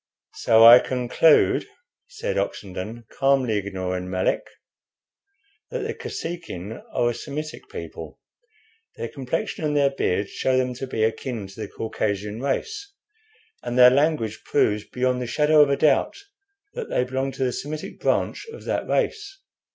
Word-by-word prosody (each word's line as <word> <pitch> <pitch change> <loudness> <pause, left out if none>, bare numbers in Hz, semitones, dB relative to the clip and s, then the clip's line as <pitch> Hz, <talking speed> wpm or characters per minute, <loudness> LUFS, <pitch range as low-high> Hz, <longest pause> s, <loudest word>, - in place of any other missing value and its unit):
"So 115 0 +5
I 120 +2 +11
conclude," 125 +6 +3 0.4
said - - -4
Oxenden, 105 - -4
calmly, 135 -5 +2
ignoring 95 -2 -3
Melick, 95 0 0 1.2
"that - - -3
the - - -2
Kosekin 140 - -6
are 120 0 +1
a - - -4
Semitic 150 +4 -7
people. - - -8 0.8
Their - - -5
complexion 140 +8 -3
and 150 -1 +1
their 140 -1 +3
beards 100 -7 -1
show 130 -1 +1
them 130 -1 0
to 130 +2 -6
be 110 -3 -1
akin 115 0 -2
to 100 +2 -13
the - - -4
Caucasian 105 0 -3
race, 405 - -3 0.7
and 120 +1 -4
their 125 0 +9
language 140 -6 +1
proves 105 0 +1
beyond 125 0 -1
the 125 - -3
shadow 150 +4 +4
of 145 - +5
a 140 - +2
doubt 155 - +2 0.6
that 475 -3 -6
they - - +1
belong 130 +2 -2
to 135 - -2
the 125 -1 0
Semitic 150 +4 -6
branch - - 0
of 460 - -11
that - - -2
race. 415 -4 -1
125 Hz, 150 wpm, -24 LUFS, 110-150 Hz, 1.2 s, I